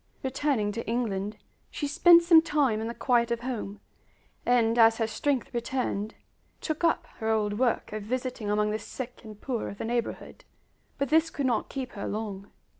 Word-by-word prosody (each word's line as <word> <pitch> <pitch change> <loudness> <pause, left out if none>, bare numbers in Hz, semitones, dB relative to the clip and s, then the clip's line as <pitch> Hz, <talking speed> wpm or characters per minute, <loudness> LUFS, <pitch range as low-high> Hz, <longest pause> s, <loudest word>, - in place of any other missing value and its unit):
Returning 265 -5 0
to 230 +2 -5
England, 215 -3 -2 0.3
she 295 - -4
spent 340 +4 +6
some 335 -2 +7
time 290 -9 +1
in 225 - -3
the 235 - -5
quiet 240 -2 +2
of 235 0 -1
home, 225 -5 -5 0.7
and 240 -1 +3
as 225 0 +6
her 225 - +1
strength 265 +4 -1
returned, 235 -3 -2 0.4
took 310 +1 -4
up 335 - +2
her 220 - -1
old 210 -1 0
work 245 -4 0
of 215 - -3
visiting 245 -1 -3
among 210 0 +1
the 215 - -2
sick 250 +3 -7
and 215 -2 -11
poor 245 -2 -3
of 200 - -9
the - - -4
neighborhood. 235 0 -3 0.5
But 280 -2 -1
this 320 +2 +4
could 280 - -3
not 240 -4 0
keep 260 -2 -5
her 200 - -5
long. 205 -2 -5
235 Hz, 185 wpm, -28 LUFS, 215-265 Hz, 0.7 s, some